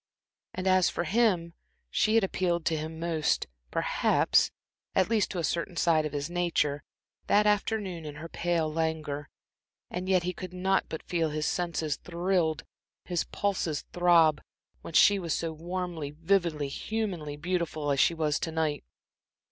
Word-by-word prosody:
And 185 - -4
as 185 -1 +4
for - - -2
him, 180 -3 +2 0.4
she 215 - +2
had 225 - +5
appealed 175 -3 0
to 165 - +2
him 160 +1 -5
most, 165 -2 0 0.2
perhaps, - - +2 0.5
at 190 +3 +2
least 215 -3 +2
to 185 - -5
a 170 - -1
certain 170 +2 -2
side 160 -3 +3
of - - -9
his 145 0 -3
nature, 170 -5 0 0.5
that 210 +1 +4
afternoon 210 -4 0
in 150 -1 -7
her 155 +3 -7
pale 165 -2 -1
languor; 155 -3 -2 0.6
and 185 +1 -4
yet 185 -2 +3
he 180 +1 -2
could 185 0 -8
not 190 +1 +1
but 160 - -7
feel 165 -3 0
his 150 0 -2
senses 165 -4 -1
thrilled, 170 -2 0 0.4
his 175 -2 -1
pulses 180 -7 -2
throb, 170 -4 +5 0.4
when 165 - -8
she 205 -1 +6
was 170 -4 -1
so 165 -1 -2
warmly, 170 -2 -4
vividly, 165 -1 0
humanly 175 -3 -3
beautiful 160 -3 -1
as 140 - +1
she 170 - +4
was 155 -2 0
to 165 - -3
night. 155 -3 -1
170 Hz, 160 wpm, -29 LUFS, 155-185 Hz, 0.6 s, she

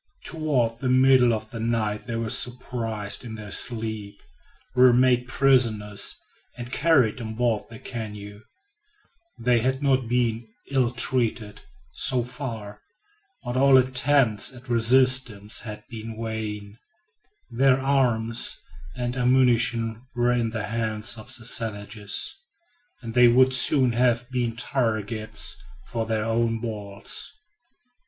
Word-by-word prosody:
Toward 130 -8 -1
the 130 - -2
middle 130 -1 +5
of 110 -1 -4
the 115 - -6
night 110 -1 -2
they 120 - -3
were 115 -1 -3
surprised 115 -4 -1
in 115 -3 -7
their 105 -2 -9
sleep, 110 -4 0 0.5
were 125 -1 +6
made 125 0 +3
prisoners, 115 -7 +2 0.4
and 120 0 -8
carried 130 -9 +2
on 110 -1 -6
board 115 -2 0
the 115 - -11
canoe. 105 -4 -8 1.0
They 120 0 +2
had 130 +4 -1
not 130 -3 +1
been 120 -1 -1 0.2
ill 130 -3 +2
treated, 120 -4 -1 0.3
so 125 - +1
far, 115 -5 -7 0.6
but 120 0 -5
all 135 0 +5
attempts 130 -3 +2
at 125 +1 -14
resistance 120 -3 +2
had 105 -2 -8
been 115 -1 -8
vain. 110 -2 -6 0.7
Their 130 +2 +3
arms 120 -4 +1 0.4
and 120 0 -3
ammunition 120 -3 +2
were 120 0 +2
in 120 -2 0
the 110 -1 -4
hands 110 +1 -1
of 110 0 -11
the 120 -3 -8
savages, 105 -3 -3 0.7
and 115 -1 -6
they 125 0 +6
would 130 +2 +4
soon 130 0 +4
have 120 +1 0
been 120 -3 -2
targets 110 -3 -3 0.2
for 115 -2 -4
their 110 -1 -1
own 115 0 0
balls. 105 - -4
115 Hz, 125 wpm, -24 LUFS, 110-125 Hz, 1.0 s, were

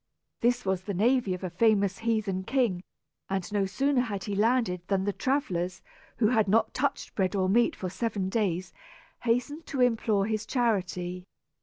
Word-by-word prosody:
This 245 0 +1
was 190 -1 0
the 200 +1 -4
navy 225 -1 +2
of 180 - -10
a 185 - -3
famous 200 0 +2
heathen 215 -5 -1
king, 230 -6 +1 0.5
and 190 +1 -2
no 200 -2 +1
sooner 270 +6 +1
had 205 -6 -3
he 205 - -4
landed 215 -3 +2
than 195 -1 +1
the 205 0 -1
travellers, 185 -11 -1 0.3
who 220 -2 +3
had 220 -4 +3
not 220 +3 +2
touched 280 +2 -2
bread 190 0 0
or 190 -1 +1
meat 235 +5 +3
for 185 - -4
seven 205 -1 -2
days, 185 -4 -1 0.5
hastened 250 +7 -1
to 275 - -4
implore 225 -5 +2
his 215 0 -1
charity. 185 -7 -1
205 Hz, 170 wpm, -28 LUFS, 190-235 Hz, 0.5 s, who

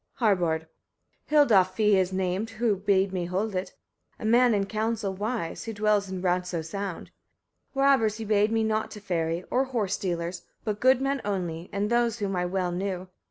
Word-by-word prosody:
Harbard. 175 -8 +1 0.6
8. - - -30
Hildolf 215 -12 +5
fief 210 0 +3
is 190 -1 +2
named 190 +3 -1
who 225 -2 +2
bade 195 0 +1
me 180 -2 -1
hold 195 +5 -2
it, 185 0 -4 0.4
a - - -7
man 240 +1 +5
in 200 -1 +1
council 220 -1 -2
wise, 205 -3 -3
who 225 - -4
dwells 210 -1 +1
in 185 -1 -5
Radso 180 -2 0
sound. 195 +1 -5 0.6
Robbers 270 -6 +3
he 225 - -5
bade 210 0 +2
me 225 0 +2
not 220 0 0
to 210 - -9
ferry, 170 -3 -2
or 260 +2 +2
horse 225 -7 -1
stealers, 175 -2 -3 0.2
but 210 -2 -2
good 260 +2 +4
men 275 0 0
only, 175 -4 -3
and 205 +2 -1
those 235 -1 +2
whom 200 -3 -2
I 180 0 0
well 180 -1 -1
knew. 185 0 -3
200 Hz, 185 wpm, -27 LUFS, 185-220 Hz, 0.6 s, Hildolf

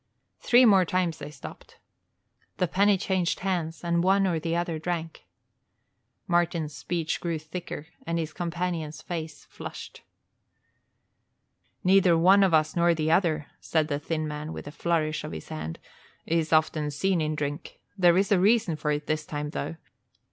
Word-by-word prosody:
Three 245 +1 +5 0.2
times 175 -3 -1
more - - -5
they - - -8
stopped. 150 -3 -11 0.8
The 180 - +1
penny 200 +3 +3
changed 185 -2 -1
hands 175 -4 -2
and 170 0 +1
one 195 +1 +4
or 170 -4 +1
the 165 +1 -2
other 170 -2 -1
drank. 165 -1 -4 1.0
Martin's 170 -3 0
speech 165 -3 -2
grew 170 -2 -1
thicker 155 0 -7 0.2
and 170 0 0
his 160 -2 -3
companion's 170 -3 -3
face 160 -4 -6
flushed. - - -9 1.8
"Neither 185 -2 +5
one 190 +4 +6
of 190 - +3
us 155 -1 +2
nor 170 0 +3
the 155 0 0
other," 160 -4 +2
said 160 -1 0
the 145 -1 -1
thin 155 +1 -2
man, 150 +1 -5
with - - -7
a 145 - -7
flourish 155 -1 -1
of - - -6
his 80 - -8
hand, 80 +1 -5 0.5
"is 165 -1 0
often 155 -1 +2
seen 175 +4 0
in 155 0 -1
drink. 145 0 -5 0.2
There 175 -3 +5
is 195 +1 +1
a 195 - +5
reason 200 -4 +3
for 150 - -2
it 150 0 -1
this 155 0 -1
time, 150 0 -4
though. 165 - -4
165 Hz, 160 wpm, -27 LUFS, 155-180 Hz, 1.8 s, one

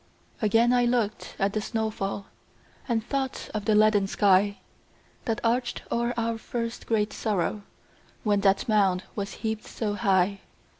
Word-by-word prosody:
Again 225 +3 +4
I 245 -1 +4
looked 235 -3 -1
at 195 +1 +1
the 215 - 0
snow 220 0 -1
fall, 195 -1 -4 0.6
And 225 -2 0
thought 270 0 -3
of 210 -2 -3
the 215 - +3
leaden 210 -2 +4
sky 200 0 +3 0.7
That 225 -1 0
arched 240 +1 0
o'er 235 +1 0
our 230 -1 -1
first 230 0 -4
great 215 -2 +1
sorrow, 210 -1 -1 0.6
When 205 -2 +2
that 195 -1 +3
mound 195 -4 +3
was 200 -1 -4
heaped 220 -1 -2
so 210 -3 -3
high. 195 -2 +2
215 Hz, 150 wpm, -27 LUFS, 200-230 Hz, 0.7 s, Again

